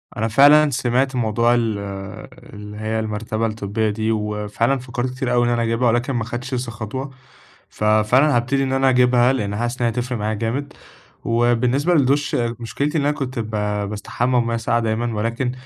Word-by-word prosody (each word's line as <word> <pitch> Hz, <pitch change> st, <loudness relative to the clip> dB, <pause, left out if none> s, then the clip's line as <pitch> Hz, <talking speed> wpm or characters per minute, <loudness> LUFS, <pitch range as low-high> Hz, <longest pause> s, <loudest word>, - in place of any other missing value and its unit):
أنا 110 Hz, -, -1 dB
فعلًا 145 Hz, +6 st, +6 dB
سمعت 130 Hz, +1 st, 0 dB
موضوع 115 Hz, 0 st, +2 dB
ال 115 Hz, -3 st, 0 dB, 0.8 s
اللي 105 Hz, 0 st, -9 dB
هيّ 110 Hz, +1 st, -2 dB
المرتبة 110 Hz, +1 st, -2 dB
الطبية 110 Hz, 0 st, -2 dB
دي، 110 Hz, +1 st, -1 dB
وفعلًا 105 Hz, +4 st, -1 dB
فكّرت 125 Hz, 0 st, -3 dB
كتير 130 Hz, -2 st, -2 dB
أوي 120 Hz, 0 st, +3 dB
إن -, -, +1 dB
أنا 120 Hz, -1 st, +1 dB
اجيبها 115 Hz, +2 st, +1 dB
ولكن 120 Hz, +4 st, +1 dB
ما 120 Hz, -3 st, -1 dB
خدتش 120 Hz, +3 st, -6 dB
لسه 125 Hz, -2 st, -2 dB
خطوة، 120 Hz, +5 st, -5 dB, 0.6 s
ففعلًا 110 Hz, +7 st, +3 dB
هابتدي 135 Hz, +3 st, +1 dB
إن 130 Hz, -1 st, -1 dB
أنا 135 Hz, 0 st, +3 dB
اجيبها، 125 Hz, 0 st, +4 dB
لإن 105 Hz, -6 st, -2 dB
حاسس 120 Hz, +2 st, -3 dB
إن -, -, -1 dB
هي -, -, +2 dB
هتفرق 125 Hz, 0 st, -3 dB
معايا 105 Hz, +1 st, -1 dB
جامد، 125 Hz, +7 st, -3 dB, 0.5 s
وبالنسبة 120 Hz, +7 st, +2 dB
للدُش 145 Hz, 0 st, +2 dB
مشكلتي 120 Hz, +6 st, -2 dB
إن -, -, +1 dB
أنا 145 Hz, +1 st, +2 dB
كنت 130 Hz, -2 st, -4 dB
ب 110 Hz, -1 st, -4 dB, 0.4 s
باستحمى 120 Hz, +4 st, 0 dB
بمَيّة 115 Hz, 0 st, -1 dB
ساقعة 115 Hz, +1 st, 0 dB
دايمًا، 115 Hz, +1 st, -1 dB
ولكن 115 Hz, +4 st, -1 dB
120 Hz, 175 wpm, -21 LUFS, 110-130 Hz, 0.8 s, فعلًا